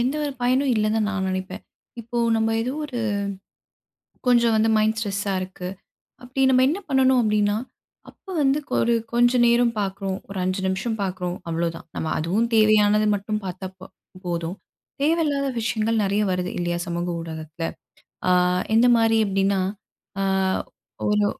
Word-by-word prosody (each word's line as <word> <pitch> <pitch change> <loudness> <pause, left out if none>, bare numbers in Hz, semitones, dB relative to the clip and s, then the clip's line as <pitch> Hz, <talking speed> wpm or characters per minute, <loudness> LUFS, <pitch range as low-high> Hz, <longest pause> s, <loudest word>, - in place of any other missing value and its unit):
எந்த 255 +4 +1
ஒரு 290 - -2
பயனும் 260 +2 +2
இல்லன்னுதான் 215 0 +1
நான் 195 -2 -2
நினைப்பேன். 185 +1 -4 0.4
இப்போ 235 +1 -4 0.2
நம்ம 225 0 +1
ஏதோ 245 +3 -2
ஒரு 255 -5 -4 1.3
கொஞ்சம் 235 -2 +4
வந்து 220 +1 +3
மைண்ட் 220 +1 +2
ஸ்ட்ரெஸ்ஸா 200 -2 -2
இருக்கு. 185 -1 -6 0.5
அப்பிடி 255 +2 -2
நம்ம 255 0 +5
என்ன 330 +7 0
பண்ணணும் 260 -1 +4
அப்பிடின்னா, 210 -1 +2 0.5
அப்ப - - -34 0.2
வந்து 275 +1 +3 0.2
ஒரு 235 - +3 0.2
கொஞ்சம் 240 +1 +4
நேரம் 235 0 +3
பார்க்குறோம், 195 -1 -3
ஒரு 195 - -6
5 185 +1 -1
நிமிஷம் 190 +4 -2
பார்க்குறோம், 180 -2 -3
அவ்ளோதான். 165 0 -2
நம்ம 160 - -2
அதுவும் 195 +9 0
தேவையானது 215 -1 +4
மட்டும் 210 +1 -2
பார்த்தா 185 +1 -5
ப் 185 - -11 0.4
போதும். 170 +1 -3 0.5
தேவையில்லாத 295 -3 +1
விஷயங்கள் 220 0 0
நிறைய 200 +2 +1
வருது 180 0 -2
இல்லயா! 175 0 -1
சமூக 175 0 -2
ஊடகத்துல. 160 0 -7 0.7
ஆ - - +5 0.4
எந்தமாரி 225 -1 +5
அப்பிடின்னா, 195 0 +1 0.6
ஆ - - +1 0.9
ஒரு 210 0 +3
215 Hz, 140 wpm, -23 LUFS, 190-235 Hz, 1.3 s, நம்ம